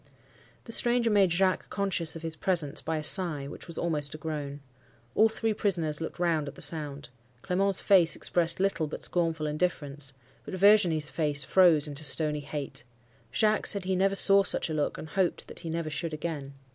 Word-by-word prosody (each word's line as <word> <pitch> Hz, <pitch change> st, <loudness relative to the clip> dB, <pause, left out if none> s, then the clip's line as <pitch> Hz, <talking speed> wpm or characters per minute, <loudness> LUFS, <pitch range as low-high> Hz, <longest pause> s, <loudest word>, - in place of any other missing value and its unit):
The 230 Hz, -, -11 dB
stranger 240 Hz, 0 st, +5 dB
made 195 Hz, -4 st, +3 dB
Jacques 185 Hz, +2 st, 0 dB
conscious 190 Hz, -5 st, -1 dB
of 165 Hz, -, -9 dB
his 165 Hz, -1 st, -4 dB
presence 165 Hz, -6 st, 0 dB
by 160 Hz, 0 st, -3 dB
a 155 Hz, -, -5 dB
sigh, 155 Hz, -5 st, -1 dB
which 145 Hz, -, -11 dB
was 170 Hz, -, -7 dB
almost 150 Hz, -4 st, -2 dB
a -, -, -7 dB
groan. 150 Hz, -3 st, -6 dB, 0.5 s
All 220 Hz, +1 st, +4 dB
three 220 Hz, 0 st, -2 dB
prisoners 165 Hz, -8 st, -2 dB
looked 165 Hz, -, -6 dB
round 165 Hz, -4 st, -1 dB
at 140 Hz, -, -8 dB
the -, -, -14 dB
sound. 150 Hz, -3 st, -3 dB, 0.3 s
Clement's 195 Hz, +1 st, +1 dB
face 180 Hz, -4 st, +5 dB
expressed 170 Hz, -1 st, 0 dB
little 185 Hz, -5 st, -1 dB
but 150 Hz, -, -8 dB
scornful 165 Hz, -3 st, -1 dB
indifference; 150 Hz, -3 st, -3 dB, 0.3 s
but -, -, -7 dB
Virginie's 185 Hz, -6 st, +3 dB
face 145 Hz, -3 st, +2 dB
froze 165 Hz, -2 st, +3 dB
into 145 Hz, +1 st, -6 dB
stony 150 Hz, 0 st, +1 dB
hate. 145 Hz, -2 st, -7 dB, 0.5 s
Jacques 215 Hz, +8 st, +1 dB
said 200 Hz, -3 st, +3 dB
he 190 Hz, 0 st, -1 dB
never 195 Hz, +1 st, +1 dB
saw 195 Hz, 0 st, +7 dB
such 180 Hz, -3 st, +1 dB
a -, -, -3 dB
look, 150 Hz, -1 st, -2 dB
and 155 Hz, -, -9 dB
hoped 185 Hz, 0 st, -2 dB
that -, -, -11 dB
he 170 Hz, -, -7 dB
never 165 Hz, -1 st, -4 dB
should 155 Hz, +2 st, -4 dB
again. 150 Hz, -3 st, -6 dB
165 Hz, 190 wpm, -27 LUFS, 150-190 Hz, 0.5 s, saw